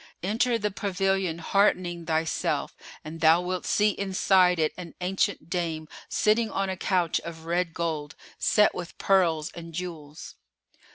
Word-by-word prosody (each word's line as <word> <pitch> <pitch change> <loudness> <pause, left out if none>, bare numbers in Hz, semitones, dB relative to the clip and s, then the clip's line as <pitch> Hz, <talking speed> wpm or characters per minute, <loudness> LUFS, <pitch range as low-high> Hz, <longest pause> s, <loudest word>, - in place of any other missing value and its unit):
Enter 230 +5 +1
the 210 -1 -2
pavilion 195 -3 -1
heartening 175 -2 +1
thyself 160 -1 -1 0.3
and 160 +1 -8
thou 160 +1 +6
wilt 180 0 -3
see 210 0 +3
inside 190 -2 +3
it 155 -1 +1
an 175 -2 -9
ancient 185 -2 -1
dame 165 -3 -3 0.2
sitting 220 +1 +2
on 195 -1 -1
a - - -3
couch 180 -3 +1
of 165 -1 -9
red 170 +1 0
gold 160 -3 -3 0.2
set 210 -1 +4
with 180 -1 -7
pearls 170 -6 +2
and 165 -1 -10
jewels. 160 -4 -7
180 Hz, 145 wpm, -26 LUFS, 165-195 Hz, 0.3 s, thou